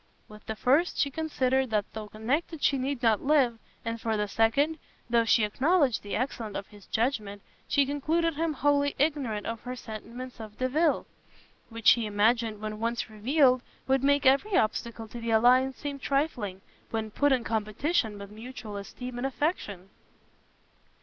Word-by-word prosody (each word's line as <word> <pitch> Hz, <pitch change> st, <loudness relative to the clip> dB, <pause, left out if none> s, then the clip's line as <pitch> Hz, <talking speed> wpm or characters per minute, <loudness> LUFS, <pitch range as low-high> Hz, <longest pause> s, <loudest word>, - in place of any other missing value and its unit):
With 210 Hz, 0 st, -14 dB
the 220 Hz, -, -3 dB
first 280 Hz, +10 st, +2 dB
she 280 Hz, -, +1 dB
considered 265 Hz, -4 st, 0 dB
that 210 Hz, -2 st, +1 dB
though 220 Hz, -1 st, -6 dB
connected 280 Hz, +9 st, -2 dB
she 275 Hz, -, +3 dB
need 265 Hz, -1 st, -2 dB
not 225 Hz, -3 st, +3 dB
live, 270 Hz, -6 st, +3 dB, 0.3 s
and 230 Hz, 0 st, -3 dB
for 225 Hz, -1 st, 0 dB
the 210 Hz, 0 st, 0 dB
second, 280 Hz, +10 st, +2 dB, 0.3 s
though 235 Hz, -1 st, +4 dB
she 225 Hz, 0 st, +4 dB
acknowledged 270 Hz, -, +2 dB
the 205 Hz, -, -4 dB
excellence 230 Hz, -4 st, -3 dB
of -, -, -5 dB
his 205 Hz, -2 st, -16 dB
judgment, 215 Hz, -4 st, -1 dB, 0.2 s
she 285 Hz, -1 st, +3 dB
concluded 315 Hz, +4 st, 0 dB
him 320 Hz, +1 st, -1 dB
wholly 285 Hz, 0 st, +2 dB
ignorant 275 Hz, -8 st, 0 dB
of 230 Hz, -1 st, -4 dB
her 250 Hz, +1 st, -5 dB
sentiments 240 Hz, +2 st, -8 dB
of 215 Hz, -1 st, -9 dB
Delvile; 295 Hz, +5 st, +1 dB, 0.6 s
which 230 Hz, -1 st, -9 dB
she 230 Hz, -2 st, +6 dB
imagined, 215 Hz, +1 st, +1 dB
when 215 Hz, 0 st, -5 dB
once 230 Hz, 0 st, -2 dB
revealed, 255 Hz, +4 st, +3 dB, 0.3 s
would 265 Hz, 0 st, +2 dB
make 285 Hz, +1 st, +3 dB
every 315 Hz, +10 st, +4 dB
obstacle 225 Hz, +1 st, -1 dB
to 235 Hz, -, -8 dB
the 230 Hz, 0 st, -4 dB
alliance 250 Hz, +4 st, +4 dB
seem 285 Hz, -1 st, -5 dB
trifling, 250 Hz, -10 st, -1 dB, 0.3 s
when 220 Hz, -1 st, -3 dB
put 285 Hz, +6 st, +2 dB
in 255 Hz, -3 st, +2 dB
competition 220 Hz, +2 st, -1 dB
with 200 Hz, 0 st, -9 dB
mutual 220 Hz, -1 st, -8 dB
esteem 245 Hz, +5 st, -7 dB
and 265 Hz, -, 0 dB
affection. 210 Hz, -, -3 dB
245 Hz, 165 wpm, -28 LUFS, 220-280 Hz, 0.6 s, she